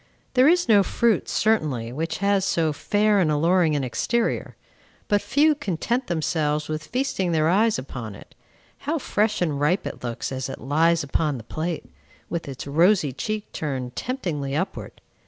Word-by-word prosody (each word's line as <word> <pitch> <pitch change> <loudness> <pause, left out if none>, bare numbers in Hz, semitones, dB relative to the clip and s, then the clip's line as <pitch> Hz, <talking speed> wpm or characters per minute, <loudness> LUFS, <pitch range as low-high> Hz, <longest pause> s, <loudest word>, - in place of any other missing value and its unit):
There 260 +1 +5
is 350 0 +4
no 210 -3 +6
fruit, 230 +3 +1
certainly, 145 - 0
which 160 +4 -3
has 200 -1 +3
so 165 -5 +1
fair 205 +6 +2
and 170 -5 +2
alluring 165 +1 +3
an 145 - 0
exterior; 230 - -1 0.5
but 205 -1 +2
few 300 +4 +3
content 245 - -2
themselves 155 -2 0
with 155 0 -4
feasting 250 -9 -1
their 155 -1 +2
eyes 210 +6 +3
upon 120 -5 -6
it. - - -15 0.5
How 310 +4 -1
fresh 215 - 0
and 150 -5 -1
ripe 170 +7 +2
it - - -6
looks 120 +1 -4
as 130 0 -3
it - - -6
lies 160 +4 +2
upon 145 0 0
the 115 - -9
plate, 160 +7 -4 0.5
with 170 -3 -3
its 135 - -7
rosy 160 0 +3
cheek 210 +11 -4
turned 130 -5 -4
temptingly 155 - -3
upward! 185 +6 -4
165 Hz, 165 wpm, -24 LUFS, 145-215 Hz, 0.5 s, no